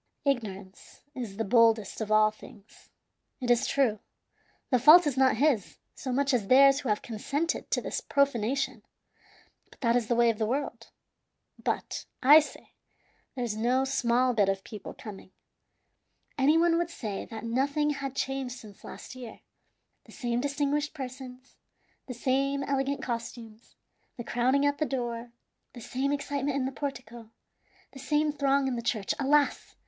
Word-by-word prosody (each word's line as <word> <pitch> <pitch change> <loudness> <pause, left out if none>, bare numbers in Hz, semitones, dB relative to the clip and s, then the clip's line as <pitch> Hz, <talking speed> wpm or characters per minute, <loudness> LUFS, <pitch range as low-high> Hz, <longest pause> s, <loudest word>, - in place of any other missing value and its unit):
"Ignorance 205 -8 -4
is 225 -6 -6
the 225 - 0
boldest 225 -2 +3
of 215 -1 -3
all 215 0 +5
things. 210 -1 -17 0.5
It 245 -2 0
is 240 - +3
true, 245 -7 +1 0.7
the 250 - +4
fault 310 +8 +8
is 290 -4 0
not 260 -3 +3
his, 265 -7 +1 0.2
so 260 - -5
much 275 +2 +1
as 220 -6 0
theirs 275 +3 +6
who 270 - -4
have 210 - 0
consented 280 +8 -3
to - - 0
this - - -4
profanation, 270 -2 0 0.9
but - - -20
that 235 -2 +2
is 240 -3 +1
the 240 - +1
way 235 0 +4
of 220 - -9
the 220 - 0
world. 275 +5 -3 0.7
But, - - -3 0.2
I 290 +4 +9
say, 305 - -8 0.6
there's 240 -4 -2
no 250 +4 +1
small 250 -1 +1
bit 205 -4 +2
of 195 0 -2
people 210 -3 -9
coming. 195 -3 -11 1.0
Any 290 +4 +4
one 335 0 +3
would 345 -1 -1
say 215 -11 -5
that 220 -2 -8
nothing 280 +6 0
had 275 -2 -5
changed 270 -2 -3
since 210 -4 -14
last - - -10
year. 250 -3 -10 0.6
The - - -16
same 240 -2 -2
distinguished 290 +2 -1
persons, 255 -1 -9 0.5
the 250 - -6
same 275 +3 0
elegant 275 0 -1
costumes, 230 -2 -7 0.4
the 235 - -5
crowding 255 +5 +1
at 285 0 0
the 305 - +1
door, 240 -2 -4 0.4
the 245 - -10
same 260 +4 -2
excitement 285 -1 -2
in 265 - -1
the 265 - -2
portico, 245 -5 -7 0.6
the 270 - -12
same 295 +3 +1
throng 280 -1 +1
in 260 - -1
the 235 - -3
church. 220 -4 -1
Alas! 285 +1 +1
255 Hz, 160 wpm, -28 LUFS, 230-280 Hz, 1.0 s, I